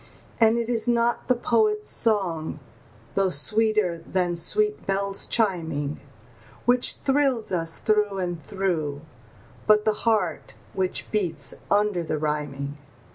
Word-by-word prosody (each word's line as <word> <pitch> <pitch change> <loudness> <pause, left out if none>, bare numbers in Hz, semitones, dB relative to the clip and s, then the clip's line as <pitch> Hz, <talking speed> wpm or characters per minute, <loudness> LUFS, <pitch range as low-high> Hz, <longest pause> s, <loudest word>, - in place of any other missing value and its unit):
And 225 0 +5
it 235 -1 -1
is 235 -1 -1
not 235 0 +1
the 255 - +4
poet's 215 -3 +1
song, 175 -9 0 0.5
though 195 -1 +2
sweeter 215 -3 +1
than 175 +1 -1
sweet 420 - 0
bells 195 0 0
chiming, 160 - 0 0.7
Which 245 0 +4
thrills 270 -6 +1
us 165 -2 0
through 210 -2 +1
and 175 -3 -3
through, 155 -5 -2 0.7
but 210 0 +5
the 215 - +3 0.2
heart 220 -2 -1 0.2
which 185 -1 -2
beats 165 -9 -1 0.2
under 205 -3 +2
the 155 -1 -2
rhyming. 145 -2 -3
195 Hz, 125 wpm, -25 LUFS, 165-225 Hz, 0.7 s, And